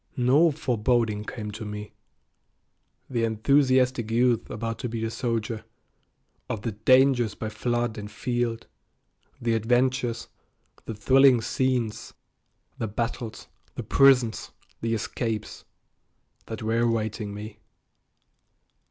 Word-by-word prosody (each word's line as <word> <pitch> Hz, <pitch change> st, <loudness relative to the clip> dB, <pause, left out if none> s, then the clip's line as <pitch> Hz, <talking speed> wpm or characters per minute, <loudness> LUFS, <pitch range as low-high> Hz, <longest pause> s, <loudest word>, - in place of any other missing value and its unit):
No 135 Hz, +7 st, +5 dB
foreboding 120 Hz, -6 st, 0 dB
came 105 Hz, -2 st, -6 dB
to 110 Hz, +2 st, -7 dB
me, 105 Hz, 0 st, -7 dB, 1.1 s
the 120 Hz, -3 st, -1 dB
enthusiastic 130 Hz, +1 st, +2 dB
youth 120 Hz, 0 st, +2 dB
about 115 Hz, +1 st, -4 dB
to 125 Hz, -, -3 dB
be 115 Hz, 0 st, -3 dB
a 110 Hz, -, -3 dB
soldier, 115 Hz, -2 st, -2 dB, 0.9 s
of 110 Hz, -1 st, -4 dB
the 115 Hz, -, -1 dB
"dangers 120 Hz, +1 st, +3 dB
by 110 Hz, -, -4 dB
flood 120 Hz, 0 st, -2 dB
and 105 Hz, 0 st, -7 dB
field," 120 Hz, 0 st, -2 dB, 0.7 s
the 120 Hz, -1 st, 0 dB
adventures, 120 Hz, +1 st, +1 dB, 0.6 s
the 110 Hz, -, -5 dB
thrilling 130 Hz, +4 st, +5 dB
scenes, 125 Hz, -2 st, -1 dB, 0.6 s
the 110 Hz, -, -1 dB
battles, 115 Hz, +1 st, -4 dB, 0.3 s
the -, -, -4 dB
prisons, 130 Hz, -5 st, +4 dB, 0.3 s
the 115 Hz, 0 st, 0 dB
escapes, 110 Hz, 0 st, -4 dB, 0.8 s
that 110 Hz, 0 st, -6 dB
were 115 Hz, +1 st, +1 dB
awaiting 110 Hz, -3 st, -1 dB
me. 105 Hz, +1 st, -8 dB
115 Hz, 110 wpm, -26 LUFS, 110-125 Hz, 1.1 s, No